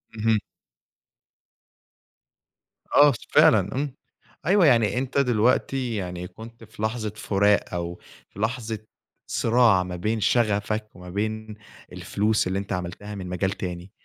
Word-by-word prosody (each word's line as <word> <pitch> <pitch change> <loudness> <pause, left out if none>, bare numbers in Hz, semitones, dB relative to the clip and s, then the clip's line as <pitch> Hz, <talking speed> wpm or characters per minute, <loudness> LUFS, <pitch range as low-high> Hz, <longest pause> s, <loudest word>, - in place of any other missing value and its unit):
اهم. 110 0 +2 2.6
آه 145 0 +8
س 115 - -8
فعلًا 135 - +4
امم، 140 0 -2 0.5
أيوه 185 +1 +5
يعني 115 -5 +4
أنت 130 +1 -2
دلوقتي 125 0 +1
يعني 90 -2 -4
كنت 115 +4 -12
في 110 -1 -12
لحظة 110 -1 -1
فراق، 105 -1 +1
أو 85 0 -4 0.3
في 100 - -14
لحظة 110 -1 -2 0.5
صراع 115 -5 +4
ما 90 0 -6
بين 110 +6 -1
شغفك 110 0 +1
وما 90 0 -11
بين 110 +2 -3 0.4
الفلوس 105 -1 0
اللي 95 +1 -1
أنت 100 0 -4
عملتها 90 +3 -5
من 95 -2 -6
مجال 90 +1 -1
تاني. 90 -2 -6
110 Hz, 130 wpm, -25 LUFS, 95-115 Hz, 2.6 s, آه